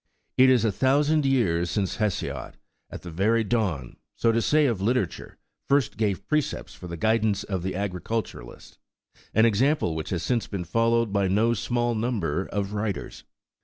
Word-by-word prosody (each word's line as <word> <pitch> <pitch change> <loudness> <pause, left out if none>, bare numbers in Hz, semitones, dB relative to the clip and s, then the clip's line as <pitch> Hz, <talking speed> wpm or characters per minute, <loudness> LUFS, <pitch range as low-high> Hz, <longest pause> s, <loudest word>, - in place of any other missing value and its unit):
It 130 0 +6
is 125 -3 +4
a 110 - +2
thousand 145 +6 +2
years 90 -10 +1
ago 100 - +2
since - - -5
Hesiod,4 105 -4 -2 0.4
at - - -9
the 90 - -7
very 110 +7 +2
dawn, 95 - -2 0.2
so 115 - +2
to 115 +1 +1
say, 150 +5 +3
of 115 -8 0
literature, 115 -3 -1 0.3
first 140 -3 +2
gave 100 -2 -1
precepts 150 +4 -1
for 90 - -10
the 85 -1 -6
guidance 110 +1 +1
of 95 -3 -3
the 95 +2 -3
agriculturist, 100 - -5 0.6
an 110 +2 +6
example 115 - +2
which 80 -1 -4
has 85 -3 -2
since 120 -3 0
been 95 -4 -4
followed 115 +1 +1
by 100 -1 +2
no 110 +5 +2
small 120 +2 -1
number 105 -7 -1
of 100 0 -3
writers. 105 -1 -4
110 Hz, 170 wpm, -25 LUFS, 95-120 Hz, 0.6 s, It